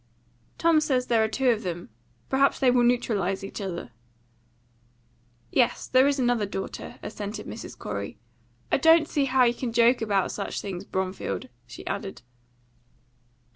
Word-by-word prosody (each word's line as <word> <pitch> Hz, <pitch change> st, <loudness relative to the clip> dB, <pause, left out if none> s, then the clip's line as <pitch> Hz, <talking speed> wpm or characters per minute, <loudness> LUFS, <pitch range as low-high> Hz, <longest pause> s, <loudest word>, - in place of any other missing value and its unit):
"Tom 330 Hz, -1 st, +4 dB
says 260 Hz, -5 st, +1 dB
there 230 Hz, -3 st, +3 dB
are -, -, +2 dB
two 255 Hz, +3 st, +2 dB
of 225 Hz, -2 st, -1 dB
them. 175 Hz, -, -5 dB, 0.4 s
Perhaps 275 Hz, +1 st, +3 dB
they 255 Hz, -2 st, +4 dB
will 245 Hz, 0 st, +4 dB
neutralise 205 Hz, -6 st, +1 dB
each 195 Hz, -, -6 dB
other." 170 Hz, -10 st, -5 dB, 1.6 s
"Yes, 245 Hz, -3 st, +2 dB
there 260 Hz, +1 st, +5 dB
is 285 Hz, 0 st, +1 dB
another 240 Hz, -5 st, +1 dB
daughter," 195 Hz, 0 st, -6 dB
assented 205 Hz, 0 st, -5 dB
Mrs. -, -, -8 dB
Corey. -, -, -5 dB, 0.5 s
"I -, -, +4 dB
don't 325 Hz, -1 st, +5 dB
see 290 Hz, -4 st, +1 dB
how 260 Hz, -1 st, +3 dB
you 240 Hz, -1 st, +4 dB
can 245 Hz, -1 st, -4 dB
joke 235 Hz, +2 st, +4 dB
about 200 Hz, -4 st, +1 dB
such 200 Hz, -, -4 dB
things, 195 Hz, -1 st, -5 dB
Bromfield," 185 Hz, -, -3 dB, 0.2 s
she 120 Hz, -, -10 dB
added. 200 Hz, -4 st, -5 dB
230 Hz, 150 wpm, -26 LUFS, 195-255 Hz, 1.6 s, there